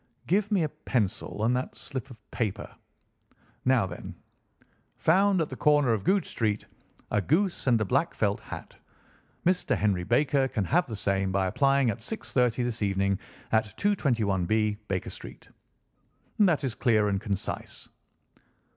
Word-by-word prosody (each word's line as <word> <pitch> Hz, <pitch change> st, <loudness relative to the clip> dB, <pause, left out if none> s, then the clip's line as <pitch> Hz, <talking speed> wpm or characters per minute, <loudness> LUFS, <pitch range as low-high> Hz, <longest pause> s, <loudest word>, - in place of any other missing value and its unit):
"Give 205 Hz, +4 st, +1 dB
me 195 Hz, -5 st, +3 dB
a 155 Hz, -, 0 dB
pencil 105 Hz, -4 st, -2 dB
and 120 Hz, +2 st, +3 dB
that 125 Hz, -, -3 dB
slip 130 Hz, -3 st, -6 dB
of 125 Hz, -, -11 dB
paper. 110 Hz, -6 st, -3 dB, 0.9 s
Now, 130 Hz, -5 st, +4 dB
then: 90 Hz, -1 st, -8 dB, 0.8 s
'Found 190 Hz, +2 st, +3 dB
at 155 Hz, -, -1 dB
the 130 Hz, -, -6 dB
corner 145 Hz, -4 st, +3 dB
of 105 Hz, -3 st, -2 dB
Goodge 195 Hz, -, +2 dB
Street, 105 Hz, -3 st, -1 dB, 0.5 s
a 105 Hz, -, +2 dB
goose 170 Hz, -, 0 dB
and 120 Hz, -3 st, +4 dB
a 110 Hz, -, 0 dB
black 135 Hz, -, +1 dB
felt 100 Hz, -2 st, 0 dB
hat. -, -, -9 dB, 0.7 s
Mr. 180 Hz, +1 st, +2 dB
Henry 100 Hz, -4 st, +1 dB
Baker 135 Hz, +5 st, +2 dB
can 115 Hz, -7 st, -2 dB
have 170 Hz, -, +2 dB
the 115 Hz, -, -5 dB
same 95 Hz, -1 st, 0 dB
by 95 Hz, 0 st, +1 dB
applying 135 Hz, +4 st, +3 dB
at 100 Hz, -, -7 dB
6:30 125 Hz, -, 0 dB
this 120 Hz, -1 st, -3 dB
evening 100 Hz, -1 st, +1 dB, 0.3 s
at 110 Hz, 0 st, +3 dB
221B, 110 Hz, -, +1 dB
Baker 95 Hz, -2 st, -2 dB
Street.' -, -, -11 dB, 0.9 s
That 175 Hz, -8 st, +4 dB
is 130 Hz, -4 st, -1 dB
clear 110 Hz, -4 st, +2 dB
and 100 Hz, -1 st, 0 dB
concise." 100 Hz, -4 st, -4 dB
120 Hz, 150 wpm, -28 LUFS, 100-145 Hz, 0.9 s, Now